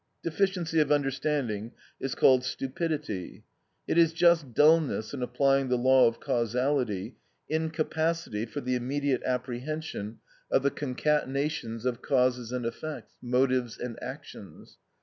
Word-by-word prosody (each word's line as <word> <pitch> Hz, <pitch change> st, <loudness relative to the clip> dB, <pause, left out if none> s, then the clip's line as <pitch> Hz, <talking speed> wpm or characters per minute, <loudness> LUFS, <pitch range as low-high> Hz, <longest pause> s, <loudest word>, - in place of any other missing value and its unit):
Deficiency 170 Hz, -1 st, 0 dB
of 150 Hz, -1 st, +2 dB
understanding 135 Hz, -6 st, 0 dB, 0.3 s
is 135 Hz, -, -3 dB
called 130 Hz, -1 st, +5 dB
stupidity. 135 Hz, -, -3 dB, 0.4 s
It 170 Hz, -, +2 dB
is 165 Hz, -1 st, +5 dB
just 165 Hz, -5 st, +3 dB
dulness 150 Hz, -7 st, +3 dB
in 135 Hz, -, -4 dB
applying 135 Hz, +2 st, +2 dB
the 125 Hz, -, +2 dB
law 130 Hz, +1 st, +5 dB
of 115 Hz, 0 st, -2 dB
causality, 120 Hz, -3 st, -1 dB, 0.3 s
incapacity 160 Hz, -5 st, -1 dB
for 145 Hz, +5 st, -5 dB
the 125 Hz, -1 st, -1 dB
immediate 135 Hz, +2 st, 0 dB
apprehension 125 Hz, -2 st, -4 dB, 0.3 s
of 135 Hz, -, +2 dB
the 140 Hz, -, +2 dB
concatenations 140 Hz, -3 st, -1 dB
of 125 Hz, -2 st, -1 dB
causes 125 Hz, -3 st, +1 dB
and 125 Hz, -2 st, -3 dB
effects, 115 Hz, 0 st, -6 dB
motives 125 Hz, -1 st, +1 dB
and 120 Hz, -2 st, -6 dB
actions. -, -, -10 dB
130 Hz, 125 wpm, -28 LUFS, 125-150 Hz, 0.4 s, called